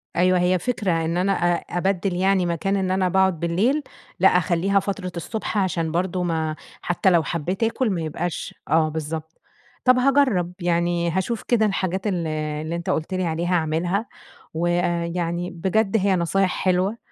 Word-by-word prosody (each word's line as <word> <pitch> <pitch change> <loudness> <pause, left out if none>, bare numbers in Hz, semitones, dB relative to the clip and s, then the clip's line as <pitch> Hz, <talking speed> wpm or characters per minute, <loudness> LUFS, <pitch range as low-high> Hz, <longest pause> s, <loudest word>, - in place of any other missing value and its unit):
أيوه 185 +1 +3
هي 180 +1 +2
فكرة، 205 -3 -1
إن 165 +2 -1
أنا 190 +2 +2
أ 175 -2 +2 0.2
أبدل 190 +1 0
يعني 190 0 +2
مكان 175 +3 -1
إن 190 -2 0
أنا 185 -1 +1
باقعد 190 -2 +2
بالليل، 205 - +1 0.4
لأ - - +6
أخليها 195 +3 +2
فترة 195 -2 -4
الصبح 215 +5 -4
عشان 170 -4 0
برضه 180 +1 -1
ما 160 -2 -1 0.3
حتى 175 +2 +1
لو 170 -3 +4
حبيت 175 +6 -2
آكل 230 +2 +1
ما 180 -4 -1
يبقاش 160 +1 -4
آه 155 +1 +3
بالضبط. 160 +1 -6 0.4
طب 255 0 +6
هاجرب، 255 -10 +2
يعني 170 0 +1
هاشوف 190 +6 -2
كده 230 -3 +2
الحاجات 190 -1 -1
اللي 155 -5 -2
اللي 160 +2 -4
أنتَ 170 0 -4
قُلت 160 +4 -1
لي 185 -1 0
عليها 170 +2 0
أعملها 175 +6 0 0.5
ويعني 175 +1 -1
بجد 195 +5 +1
هي 195 -1 +2
نصايح 180 +2 +1
حلوة، 185 +4 +1
180 Hz, 160 wpm, -23 LUFS, 170-195 Hz, 0.5 s, لأ